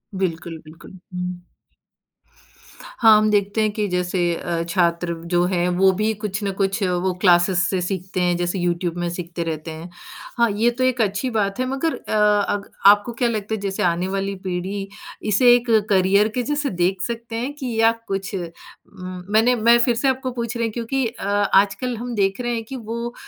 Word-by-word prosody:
बिल्कुल, 165 -3 -3
बिल्कुल। 165 +4 -14
हुँ। 180 0 -4 1.6
हाँ, 220 -2 +7
हम 215 0 +2
देखते 205 +1 +1
हैं 215 -1 +1
कि 210 0 -2
जैसे 180 0 -1 0.2
अ, 170 -1 -3
छात्र 170 0 +1 0.2
जो 175 0 +4
हैं 180 -1 0
वो 190 0 +5
भी 220 +1 +1
कुछ 205 0 -3
न 200 - -1
कुछ 195 +1 0
वो 180 0 0
क्लासेस 175 -1 +4
से 185 -2 -1
सीखते 185 0 -3
हैं 175 -1 +2
जैसे 175 +2 -2
यूट्यूब 175 0 -1
में 175 0 -2
सीखते 170 0 -5
रहते 160 0 -5
हैं। 160 +2 -8 0.5
हाँ, 235 -1 +3
ये 220 +4 +2
तो 250 +2 -2
एक 255 -2 +1
अच्छी 210 +4 0
बात 210 -2 -1
है 255 - +1
मगर 275 +5 -1
अ, - - -5 0.3
अग 205 -1 -3 0.2
आपको 205 +3 +6
क्या 240 +1 0
लगता 220 -1 -3
है 220 - -2
जैसे 195 -1 -2
आने 175 +1 +1
वाली 195 +1 -2
पीढ़ी 190 +2 -3 0.4
इसे 240 +4 +6
एक 245 0 -2 0.2
करियर 200 +2 +4
के 250 - 0
जैसे 290 +2 -1
देख 180 +1 0
सकते 235 +2 -4
हैं 250 +5 -3
कि 260 -5 -5
या 225 - +6 0.2
कुछ 195 +1 -3
उम, 185 +1 -9
मैंने 225 +4 +4
मैं 235 +1 +5
फिर 235 0 +2
से 250 +4 0
आपको 260 0 0
पूछ 235 -1 -4
रही 230 -1 0
क्योंकि 240 +3 -2
अ, 225 - -8
आजकल 205 +4 +2
हम 240 +1 -5
देख 195 +2 0
रहे 240 0 -1
हैं 225 -1 -3
कि 265 - -8
वो 235 0 -5
200 Hz, 195 wpm, -21 LUFS, 180-235 Hz, 1.6 s, हाँ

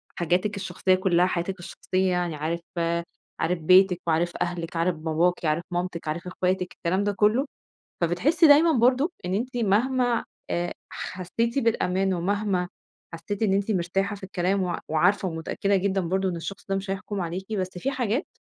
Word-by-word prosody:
حاجاتِك 180 +5 0
الشخصية 190 -1 +1
كُلها، 180 -1 +3
حياتِك 185 +1 -2
الشخصية، 185 +1 -1
يعني 175 -3 -1
عارف 160 +3 -2 0.8
عارف 175 +1 0
بيتِك 185 +2 +5
وعارف 170 +2 +1
أهلِك، 175 -1 -3
عارف 170 +1 +1
باباكِ، 165 +2 0
عارف 155 +3 +1
مامتِك، 175 -2 -3
عارف 170 +4 -3
إخواتِك، 180 0 -1
الكلام 185 +4 -1
ده 205 - +1
كُلّه، 215 +7 +3 0.6
فبتحسّي 265 - +3
دايمًا 305 +3 +7
برضه 260 +4 +3
إن 180 - -2
أنتِ 245 +5 -2
مهما 240 +3 +2 0.3
آآ 175 0 -1 0.2
حسّيتِ 230 +8 -2
بالأمان 190 -5 +1
ومهما 190 0 0 0.5
حسّيتِ 200 +5 -5
إن 195 -3 +3
أنتِ 200 +2 +1
مرتاحة 195 +2 0
في 195 - -14
الكلام 190 +1 0
وع 175 -1 -2
وعارفة 180 +5 +2
ومتأكّدة 175 +4 -1
جدًا 195 0 +1
برضه 190 +2 0
إن 175 - -3
الشخص 195 +4 -7
ده 195 - +1
مش 195 0 -4
هيحٌكم 195 +1 -4
عليكِ، 185 +5 -4
بس 185 -2 -1
في 270 +10 -1
حاجات 245 0 -1
185 Hz, 165 wpm, -25 LUFS, 175-205 Hz, 0.8 s, دايمًا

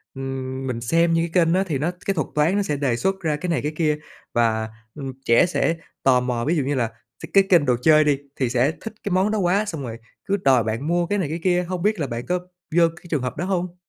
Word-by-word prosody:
ưm, 135 0 -4
mình 120 -2 -3
xem 165 +7 +2
những 165 0 +2
cái 175 -3 +4
kênh 165 - +2
nó 190 - +3
thì 165 -7 -2
nó 160 +5 0
cái 195 - +1
thuật 155 -7 -1
toán 150 +5 +3
nó 205 - +2
sẽ 150 -6 -1
đề 135 -4 +1
xuất 190 +10 -1
ra 155 -4 0
cái 175 +5 -4
này 165 - +1
cái 150 - -2
kia, 155 -2 +1 0.4
và, 110 -2 +1 0.3
ừm, 135 -3 -6
trẻ 115 +9 +5
sẽ 170 -1 0 0.3
tò 130 -2 +5
mò? 125 -1 -2
Ví 165 - +1
dụ 150 - +1
như 140 +2 -1
là 120 -3 +1 0.4
th - - -2
cái 195 - +7
kênh 170 -6 +5
đồ 125 - +3
chơi 155 +1 +6
đi 145 -2 +2 0.2
thì 130 -3 0
sẽ 125 +4 +2
thích 225 - -6
cái 205 - -3
món 190 +4 +2
đó 215 - 0
quá 195 +3 +2
xong 160 -8 -5
rồi 115 -3 -6 0.3
cứ 200 +1 +1
đòi 130 - +3
bạn 115 +7 -3
mua 175 +1 +2
cái 205 +3 0
này 165 -7 -1
cái 165 +2 -3
kia, 180 -1 +2
hông 180 0 -4
biết 210 -1 +1
là 145 - -1
bạn 120 -1 -5
có 180 0 0 0.4
vô 170 - +6
cái - - -17
trường 150 -5 0
hợp 125 0 -4
đó 175 - -2
hông? 180 -2 -2
155 Hz, 280 wpm, -23 LUFS, 130-180 Hz, 0.4 s, cái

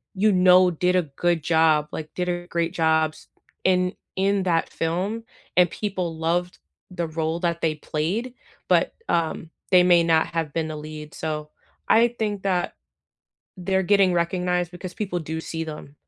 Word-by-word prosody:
you 210 +3 +3
know 180 -1 +6
did 180 +2 +1
a 180 - +3
good 165 +2 -1
job, 160 -2 +3
like, 155 -1 -7
did 180 0 -2
a 175 0 -3
great 170 0 -1
jobs 160 -2 +1 0.4
in 180 0 +2 0.2
in 195 +1 +1
that 170 -3 +1
film, 185 +8 -2 0.3
and 180 -2 +5
people 185 -6 -3
loved 175 +2 -1 0.3
the 170 -2 -3
role 160 +1 -2
that 170 -1 -1
they 160 -1 +1
played, 180 +12 -3 0.3
but, - - +3
um, 165 -1 -1 0.2
they 180 -1 +7
may 175 -1 +5
not 165 -1 +3
have 160 -3 -3
been 160 -1 -2
a - - -5
lead. 150 0 -8
So, 150 -1 -4 0.4
I 230 +2 +5
think 205 -2 -1
that 185 -3 0 0.8
they're 190 +1 0
getting 195 -1 +4
recognized 180 0 0
because 180 0 -8
people 195 -5 -3
do 160 0 -4
see 160 0 -5
them. 150 -2 -9
175 Hz, 165 wpm, -24 LUFS, 160-185 Hz, 0.8 s, they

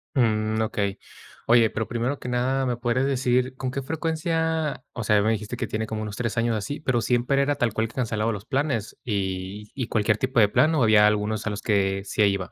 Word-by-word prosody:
Mm. 110 -3 +1
Okey. 100 -2 -2 0.5
Oye, 115 -1 +5
pero 110 0 -3
primero 120 +4 -2
que - - -8
nada, 130 +2 0
me 125 - 0
podrías 120 +2 0
decir 130 -1 +1
¿con 130 -1 -3
qué 140 - -3
frecuencia? 160 -1 -1
O 115 - -4
sea, 105 - +3
a - - +5
mí - - -1
me 110 - +3
dijiste 110 +2 -3
que - - -2
tiene 110 0 -3
como 110 0 -4
unos 105 -2 -5
3 115 -1 -2
años 115 -1 +1
así, 145 +9 -4
¿pero 130 -5 +1
siempre 125 +4 +1
era 145 +1 +1
tal 120 -5 0
cual 110 +1 0
que 115 - -17
cancelaba 115 -3 0
los 100 +1 -7
planes 135 -6 -1
y 100 -1 -3
y 125 -4 -3
cualquier 105 -1 +1
tipo 130 +1 0
de 105 - +5
plan, 155 +8 +3
o 140 - +3
había 105 -1 +6
algunos 105 +1 -1
a - - +1
los 105 0 -4
que 100 -3 +1
sí - - -1
iba? 100 -2 0
115 Hz, 235 wpm, -25 LUFS, 105-130 Hz, 0.5 s, había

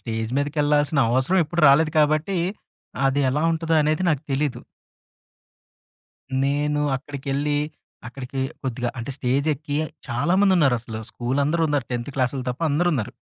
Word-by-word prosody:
Stage 115 -1 -3
మీదకెళ్ళాల్సిన 145 +1 +1
అవసరం 130 +10 +2
ఎప్పుడు 170 +3 -2
రాలేదు 155 +3 +4
కాబట్టి, 155 +5 +2 0.7
అది 135 +1 +1
ఎలా 150 +4 0
ఉంటదో 165 0 0
అనేది 155 +3 +1
నాకు 150 -2 0
తెలీదు. 140 0 -1 1.8
నేను 145 +1 0 0.2
అక్కడికెళ్ళి 140 +1 -2 0.5
అక్కడికి 135 +2 -6 0.2
కొద్దిగా 125 -2 -2
అంటే 115 +4 -5
స్టేజెక్కి 145 +3 -1 0.3
చాలామందున్నారసలు. 135 - +2
స్కూలందరున్నారు. 145 +3 0
10థ్ 120 +3 -3
క్లాసోళ్ళు 130 0 -1
తప్ప 125 +7 -6
అందరున్నారు. 150 -6 0
145 Hz, 110 wpm, -23 LUFS, 130-155 Hz, 1.8 s, రాలేదు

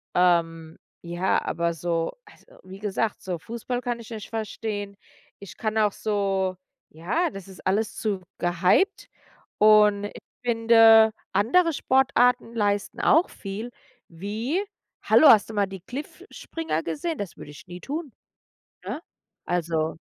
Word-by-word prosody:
Ähm, 165 -2 +1 0.3
ja, 175 +2 0
aber 170 0 -1
so 165 - -2
also - - -20 0.2
wie 190 +1 -11
gesagt, 210 +1 -2
so 180 -3 -4
Fußball 235 +5 -5
kann 240 -1 -3
ich 230 0 -12
nicht 215 -3 -7
verstehen. 210 -2 -4 0.4
Ich 200 - -11
kann 215 -1 -2
auch 210 -2 +3
so 195 -3 -1 0.3
ja, 225 - -1
das 195 -1 -10
ist 190 - -14
alles 210 +3 0
zu 205 -4 -2 0.2
gehypt. 180 - +2 0.5
Und 210 -1 +5
ich 205 - -8 0.2
finde, 225 -1 +6 0.2
andere 330 - +3
Sportarten 250 -3 +2
leisten 205 -2 -1
auch 325 +4 +4
viel 210 +4 -7 0.4
wie, 215 - -3 0.4
hallo, 310 - +6
hast 215 -3 +6
du - - -7
mal 205 -1 +2
die 190 -2 -9
Cliffspringer 295 - -6
gesehen? 320 - -3
Das 200 -4 -6
würde - - -10
ich 145 - -13
nie 175 0 -9
tun, 295 -2 -5 0.7
ne? 320 - -5 0.4
Also 165 -2 -1
210 Hz, 135 wpm, -25 LUFS, 180-235 Hz, 0.7 s, finde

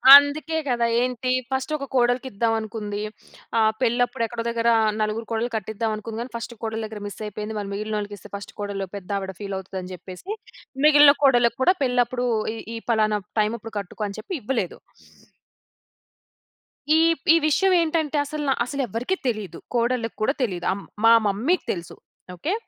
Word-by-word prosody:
అందుకే 285 +2 +4
కదా! 240 -2 +2 0.2
ఏంటి, 250 0 -1 0.2
ఫస్టొక 275 +2 -1
కోడలికిద్దావనుకుంది. 225 -4 0 0.6
ఆహ్, 220 0 +4
పెళ్ళప్పుడెక్కడో 240 -1 0
దగ్గరా 235 0 +2 0.3
నలుగురు 215 +2 -1
కోడళ్లు 230 +2 -1
కట్టిద్దావనుకుంది 220 +1 -3
గానీ, 245 - -6
ఫస్టు 235 +1 -5
కోడలి 220 0 -2
దగ్గర 215 -1 -8
మిస్సయిపోయింది. 210 +1 -6
మరి 200 -1 -5
మిగిలినోళ్ళకిస్తే, 210 -1 -4
ఫస్టు 200 - -8
కోడలు, 200 -1 -3
పెద్దావిడ 195 0 -3
ఫీలవుతదని 190 -2 -5
జెప్పేసి 185 - -8 0.5
మిగిలిన 295 -1 +8
కోడళ్ళకు 240 -3 +4
కూడా 365 - +6
పెళ్ళప్పుడూ 245 -1 +1 0.3
ఈ, - - -7 0.2
ఈ - - -3
పలానా 215 -1 +2 0.2
టైమప్పుడు 225 +1 -1
కట్టుకో 200 +2 -6
అని 200 - -8
చెప్పి 230 - -6
ఇవ్వలేదు. 220 -5 -2 2.2
ఈ, - - +6 0.4
ఈ - - +6
విషయవేంటంటే 325 -3 +2
అసలన, 295 0 -3 0.2
అసలెవ్వరికీ 250 +4 -2
తెలీదు. 210 -8 -3 0.2
కోడళ్ళకు 235 -1 0
కూడా 240 +6 +2
తెలీదు. 180 -7 -2
ఆహ్, 195 - -2
హ్మ్, - - -15 0.2
మా 230 - +8
మమ్మీ‌కి 250 - +1
తెలుసు. 170 -2 -6 0.4
ఓకే? 310 - -2
230 Hz, 130 wpm, -24 LUFS, 210-255 Hz, 2.2 s, మిగిలిన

